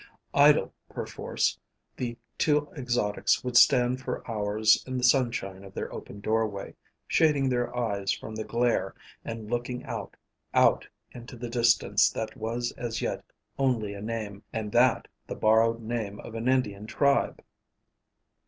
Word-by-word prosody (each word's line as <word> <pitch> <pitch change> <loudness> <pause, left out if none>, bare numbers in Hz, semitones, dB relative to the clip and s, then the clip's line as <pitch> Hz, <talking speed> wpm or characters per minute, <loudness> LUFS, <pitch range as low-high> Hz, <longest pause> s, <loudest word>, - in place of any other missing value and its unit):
Idle 145 +1 +5 0.2
perforce, - - -2 0.4
the 120 -2 -4 0.2
two 150 -1 +2
exotics 120 -7 0
would 125 -1 -4
stand 125 0 +5
for - - -5
hours 110 -1 +2
in 130 0 -3
the 125 - -3
sunshine 120 -7 +1
of 95 -1 -13
their - - -4
open 100 - -9
doorway, 110 -2 -1 0.3
shading 150 -4 +3
their 125 -1 -1
eyes 100 -5 -1
from 110 - -5
the 110 0 -4
glare 120 +2 0 0.3
and 115 -1 -6
looking 120 +1 -2
out, - - -6 0.4
out - - +4 0.2
into 120 +1 -10
the 120 0 -6
distance 120 -1 +4
that 110 -1 -5
was 120 +2 -2
as 115 -3 -3
yet - - -2 0.4
only 120 -7 +1
a 100 - -8
name 105 -2 -4
and 110 -2 -4
that 125 +2 +3 0.2
the - - -5
borrowed 115 +1 +3
name 110 -3 -3
of - - -10
an 115 +2 -3
Indian 110 -6 0
tribe. 140 +3 +1
115 Hz, 145 wpm, -28 LUFS, 110-125 Hz, 0.4 s, Idle